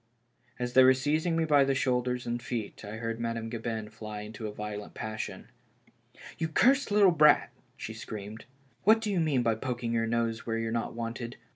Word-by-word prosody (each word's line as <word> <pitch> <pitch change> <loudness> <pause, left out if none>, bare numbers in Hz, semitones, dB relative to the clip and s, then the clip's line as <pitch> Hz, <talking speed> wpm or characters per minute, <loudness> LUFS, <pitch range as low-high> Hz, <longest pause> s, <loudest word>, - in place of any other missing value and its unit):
As 125 0 -3
they 130 - +8
were 130 0 +7
seizing 155 +5 0
me 165 - +2
by 145 -3 +5
the 135 0 +1
shoulders 125 -1 0
and 120 0 -2
feet, 115 -4 -5
I 105 +1 -6
heard 115 0 -4
Madame 115 -1 -3
Gabin 115 -2 -4
fly 105 -1 -7
into 110 +1 -6
a - - -5
violent 105 0 -6
passion. 110 0 -5 0.9
"You 165 - 0
cursed 265 - +3
little 205 -2 +5
brat," 150 -2 +5 0.3
she - - -6
screamed, 105 +1 -8 0.4
"what 220 +2 +6
do 220 -2 -2
you 190 - +1
mean 145 -6 +2
by 115 -1 +2
poking 120 0 -3
your 115 0 +1
nose 115 0 -1
where 115 -1 -2
you're 115 0 -2
not 115 0 -2
wanted 115 +1 -5
120 Hz, 190 wpm, -29 LUFS, 115-140 Hz, 0.9 s, they